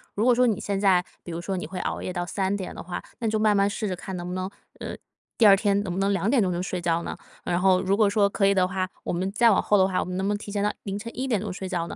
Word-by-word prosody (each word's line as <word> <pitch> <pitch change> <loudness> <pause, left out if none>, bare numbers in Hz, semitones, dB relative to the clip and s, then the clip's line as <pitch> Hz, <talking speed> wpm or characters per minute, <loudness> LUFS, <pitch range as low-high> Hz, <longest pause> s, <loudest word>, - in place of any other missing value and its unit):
如 210 - 0
果 250 - +6
说 250 - +4
你 215 -3 +1
现 200 -2 -2
在 190 -3 +4 0.2
比 175 - -7
如 165 +1 -4
说 190 +2 -3
你 180 - -4
会 185 - -6
熬 - - -3
夜 185 - -4
到 175 -1 -2
3 190 +2 -1
点 190 -3 -5
的 - - -7
话， 175 0 -5 0.2
那 230 - -1
你 - - 0
就 215 - +1
慢 215 -1 +3
慢 200 0 +3
试 210 +1 -3
着 185 - -2
看 190 +1 -7
能 175 0 -5
不 180 - -4
能 185 +1 -3 0.3
呃， - - -5 0.4
第 230 - +5
2 200 -2 +9
天 200 0 +1
能 190 - -4
不 185 - -3
能 200 +1 +2
2 195 +2 0
点 250 -1 +4
钟 185 - 0
就 175 0 -2
睡 185 -1 -3
觉 170 -1 +1
呢？ - - -5 0.3
然 175 0 0
后 185 -1 +4
如 195 +1 +1
果 215 -2 +4
说 200 0 +3
可 195 - +1
以 200 - +4
的 185 -2 +3
话， 185 0 -2 0.2
我 - - -2
们 185 +3 -1
再 230 +3 +4
往 195 - +3
后 210 - +3
的 190 -1 +4
话， 185 - 0
我 - - -1
们 180 - -5
能 190 - -1
不 205 - +1
能 205 - -1
提 205 - -8
前 200 0 -1
到 210 - +2
凌 200 0 -4
晨 230 +2 -7
1 260 +1 -2
点 225 -6 +1
钟 210 -2 -4
睡 190 +1 -5
觉 170 -2 -2
呢？ - - -7
195 Hz, 355 characters per minute, -25 LUFS, 185-205 Hz, 0.4 s, 2